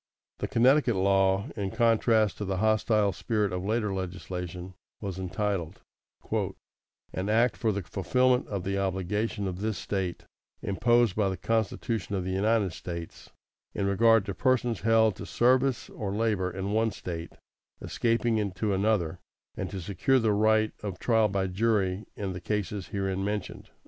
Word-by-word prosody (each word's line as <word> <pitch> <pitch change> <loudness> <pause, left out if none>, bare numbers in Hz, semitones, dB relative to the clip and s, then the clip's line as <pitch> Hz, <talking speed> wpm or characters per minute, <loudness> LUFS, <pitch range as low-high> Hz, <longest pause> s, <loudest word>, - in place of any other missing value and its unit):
The - - -2
Connecticut 130 0 +4
law, 95 +3 +2
in 100 -3 -2
contrast 115 -1 +2
to 105 - -2
the 95 -1 -2
hostile 110 -1 +2
spirit 105 +1 -1
of 90 0 -3
later 105 0 0
legislation, 90 -1 -5 0.3
was 95 -3 -5
entitled, 95 -2 -2 1.3
"An 95 +2 -2
Act 115 +1 +3
for 110 - 0
the 100 -1 -3
fulfilment 125 +9 +1
of 100 -3 -3
the 100 +1 -1
obligation 100 +2 -1
of 90 -1 -4
this 110 -1 -1
State 95 -3 -3 0.4
imposed 120 +1 +2
by 105 -2 +2
the 95 - -3
Constitution 110 -2 -1
of 95 - -1
the 95 - -3
United 100 -1 +1
States 85 -1 -7 0.5
in 100 - 0
regard 115 +1 +4
to 100 - -3
persons 120 0 +1
held 110 -2 +4
to - - -7
service 130 +1 +2
or 100 -3 -4
labor 105 -4 +1
in 95 +2 -4
one 110 +1 +2
State 85 -5 -6 0.5
escaping 115 -1 0
into 100 +1 -1
another, 95 -4 +1 0.4
and - - -4
to 95 - -5
secure 100 +9 +1
the 115 -4 +2
right 110 +1 +3
of 100 -4 -5
trial 110 0 +3
by 95 -1 -1
jury 100 0 0
in 100 -2 -3
the 90 - -7
cases 105 -2 -3
herein 95 +1 -2
mentioned." 105 0 -4
100 Hz, 155 wpm, -28 LUFS, 95-110 Hz, 1.3 s, Connecticut